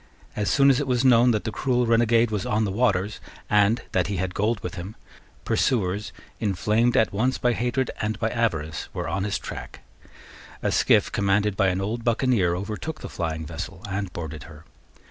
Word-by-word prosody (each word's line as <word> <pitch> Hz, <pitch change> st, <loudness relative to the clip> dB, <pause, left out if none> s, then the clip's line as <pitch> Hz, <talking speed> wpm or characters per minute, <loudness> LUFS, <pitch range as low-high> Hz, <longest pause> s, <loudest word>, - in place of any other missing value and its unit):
As 105 Hz, -1 st, -1 dB
soon 140 Hz, -1 st, +5 dB
as 135 Hz, -, +2 dB
it 145 Hz, -, -2 dB
was 125 Hz, 0 st, +1 dB
known 125 Hz, -1 st, +6 dB
that 110 Hz, -3 st, +1 dB
the 110 Hz, -, -3 dB
cruel 125 Hz, +1 st, 0 dB
renegade 115 Hz, 0 st, +3 dB
was 105 Hz, -3 st, -1 dB
on 105 Hz, +1 st, 0 dB
the 100 Hz, -, -2 dB
waters, 105 Hz, -2 st, 0 dB, 0.3 s
and 105 Hz, +3 st, +3 dB
that 90 Hz, -2 st, +1 dB
he 100 Hz, -1 st, -2 dB
had 90 Hz, 0 st, -2 dB
gold 105 Hz, +3 st, 0 dB
with -, -, -5 dB
him, 95 Hz, +3 st, -7 dB, 0.5 s
pursuers, 105 Hz, -4 st, 0 dB, 0.3 s
inflamed 110 Hz, +4 st, +1 dB
at 110 Hz, -, +3 dB
once 125 Hz, +6 st, +1 dB
by 120 Hz, -1 st, +1 dB
hatred 125 Hz, +3 st, -1 dB
and 110 Hz, 0 st, -1 dB
by 110 Hz, -, 0 dB
avarice, 80 Hz, -11 st, -2 dB
were -, -, -3 dB
on 95 Hz, +4 st, -1 dB
his 105 Hz, -, -1 dB
track, -, -, -8 dB, 0.8 s
A -, -, +1 dB
skiff, -, -, +3 dB
commanded 100 Hz, 0 st, +1 dB
by 95 Hz, -, +2 dB
an 95 Hz, 0 st, 0 dB
old 115 Hz, +4 st, -3 dB
buccaneer, 115 Hz, -7 st, +2 dB
overtook 110 Hz, -, -5 dB
the -, -, -6 dB
flying 80 Hz, -2 st, -3 dB
vessel 85 Hz, +3 st, -7 dB
and 95 Hz, -1 st, -3 dB
boarded 80 Hz, -2 st, -6 dB
her. 80 Hz, -2 st, -14 dB
105 Hz, 190 wpm, -25 LUFS, 95-120 Hz, 0.8 s, known